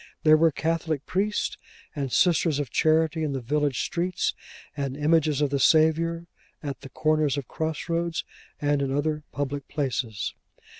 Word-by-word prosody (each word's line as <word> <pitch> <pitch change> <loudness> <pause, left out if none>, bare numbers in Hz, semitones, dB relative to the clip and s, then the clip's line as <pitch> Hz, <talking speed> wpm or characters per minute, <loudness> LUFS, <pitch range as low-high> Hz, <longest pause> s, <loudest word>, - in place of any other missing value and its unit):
There 155 0 +7
were 165 +1 +5
Catholic 160 -1 -1
Priests 205 +3 -1 0.4
and 140 -3 -3
Sisters 165 -2 +3
of 145 -4 -3
Charity 160 +1 +2
in 150 -2 -1
the 135 - -2
village 145 +2 0
streets; 180 +1 -1 0.4
and 140 -2 -3
images 150 -1 +2
of 145 -2 +1
the 140 - +1
Saviour 165 +3 +3 0.4
at 140 -2 -5
the 135 - -9
corners 155 -1 +1
of 140 - -4
cross 160 +1 -3
roads, 170 0 -1 0.4
and 145 -1 +1
in 135 -1 -1
other 150 +2 0
public 140 0 -3
places. 125 -7 -2
150 Hz, 155 wpm, -26 LUFS, 140-160 Hz, 0.4 s, There